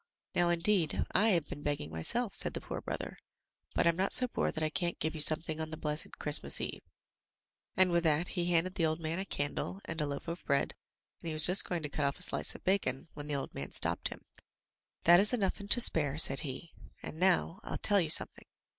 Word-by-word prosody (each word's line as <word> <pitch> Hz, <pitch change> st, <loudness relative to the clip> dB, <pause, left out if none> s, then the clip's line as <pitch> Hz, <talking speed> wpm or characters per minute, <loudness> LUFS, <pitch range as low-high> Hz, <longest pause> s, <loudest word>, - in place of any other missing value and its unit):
"Now, 175 Hz, 0 st, +1 dB
indeed, 175 Hz, 0 st, +2 dB
I 215 Hz, -, +2 dB
have 170 Hz, -7 st, +1 dB
been 145 Hz, -, -8 dB
begging 145 Hz, -, -3 dB
myself," 195 Hz, -, 0 dB
said -, -, +1 dB
the -, -, -5 dB
poor -, -, -6 dB
brother, -, -, -6 dB, 0.6 s
"but -, -, +2 dB
I'm 170 Hz, -1 st, +3 dB
not 190 Hz, +3 st, -1 dB
so 250 Hz, -, +6 dB
poor -, -, -2 dB
that 155 Hz, -, -5 dB
I 155 Hz, -, -1 dB
can't 175 Hz, +2 st, -2 dB
give 160 Hz, -, -3 dB
you 160 Hz, -, -1 dB
something 155 Hz, +1 st, +3 dB
on 160 Hz, -, -5 dB
the 160 Hz, -, -7 dB
blessed 150 Hz, -1 st, -5 dB
Christmas 150 Hz, -1 st, +1 dB
eve." -, -, -5 dB, 1.0 s
And 185 Hz, -1 st, +5 dB
with 170 Hz, 0 st, +1 dB
that 160 Hz, +2 st, +1 dB
he 175 Hz, -, -2 dB
handed 175 Hz, +2 st, +1 dB
the 165 Hz, -, 0 dB
old 160 Hz, +1 st, -2 dB
man 165 Hz, +2 st, -3 dB
a 195 Hz, -, -4 dB
candle, 145 Hz, +3 st, -4 dB
and 160 Hz, -, -4 dB
a 150 Hz, -, -1 dB
loaf 140 Hz, +2 st, -6 dB
of 170 Hz, +1 st, -6 dB
bread, 140 Hz, -1 st, 0 dB, 0.5 s
and -, -, -9 dB
he 160 Hz, -, -3 dB
was 155 Hz, 0 st, +2 dB
just 180 Hz, +2 st, +5 dB
going 175 Hz, -3 st, -3 dB
to 150 Hz, -, -3 dB
cut 145 Hz, -, -3 dB
off 140 Hz, -, -3 dB
a 180 Hz, -, 0 dB
slice -, -, +1 dB
of -, -, -12 dB
bacon, 170 Hz, -8 st, -1 dB
when 145 Hz, 0 st, -9 dB
the 150 Hz, -, -2 dB
old 140 Hz, -, -5 dB
man -, -, -6 dB
stopped -, -, +1 dB
him -, -, -10 dB, 0.4 s
— -, -, -56 dB
"That 175 Hz, +1 st, +7 dB
is 210 Hz, +5 st, +2 dB
enough 200 Hz, -6 st, -1 dB
and 200 Hz, 0 st, -9 dB
to 245 Hz, -, +7 dB
spare," 150 Hz, -, +3 dB
said 135 Hz, -4 st, +5 dB
he. 140 Hz, +4 st, -7 dB, 0.3 s
"And 160 Hz, -, -8 dB
now, 185 Hz, -1 st, +1 dB
I'll -, -, -5 dB
tell 205 Hz, -2 st, +3 dB
you 160 Hz, -, -2 dB
some -, -, +5 dB
thing. -, -, -20 dB
165 Hz, 245 wpm, -31 LUFS, 150-185 Hz, 1.0 s, That